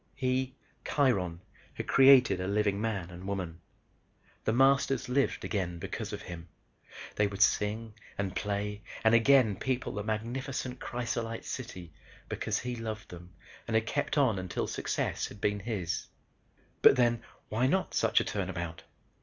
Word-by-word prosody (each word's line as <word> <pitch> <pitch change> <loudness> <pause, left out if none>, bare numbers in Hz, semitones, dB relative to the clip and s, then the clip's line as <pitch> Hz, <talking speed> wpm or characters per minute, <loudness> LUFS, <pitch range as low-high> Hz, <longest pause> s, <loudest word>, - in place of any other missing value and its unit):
He, 130 0 0 0.3
Kiron, 95 - +1 0.3
had - - -4
created 130 -8 +6
a 95 - -2
living 100 0 +1
man 100 -6 -2
and 90 +2 -9
woman. 90 -4 -4 0.8
The - - +3
Masters 135 +1 +3
lived 130 +2 +1
again 90 -5 -2
because 100 +4 -5
of 105 - -6
him. 85 -1 -8 0.7
They 105 - +4
would 100 0 +2
sing 110 +2 +1 0.2
and 95 -2 -2
play 105 +1 -2 0.2
and 110 0 +5
again 115 -3 +5
people 130 -1 -2
the 105 - -3
magnificent 125 +4 -3
crysolite 115 -2 -3
city 90 -11 -6 0.4
because - - -1
he 125 0 -3
loved 110 -2 -5
them 90 0 -11 0.3
and 115 - -1
had 110 0 +3
kept 145 +4 -1
on 125 -9 +3
until 90 -2 -2
success - - -2
had 100 - -12
been 105 0 0
his. 100 -5 -3 0.7
But - - +8
then 120 -2 +2 0.3
why 120 +4 +2
not 190 +7 0
such 115 0 +3
a - - +1
turnabout? 85 -4 -3
110 Hz, 150 wpm, -30 LUFS, 95-125 Hz, 0.8 s, But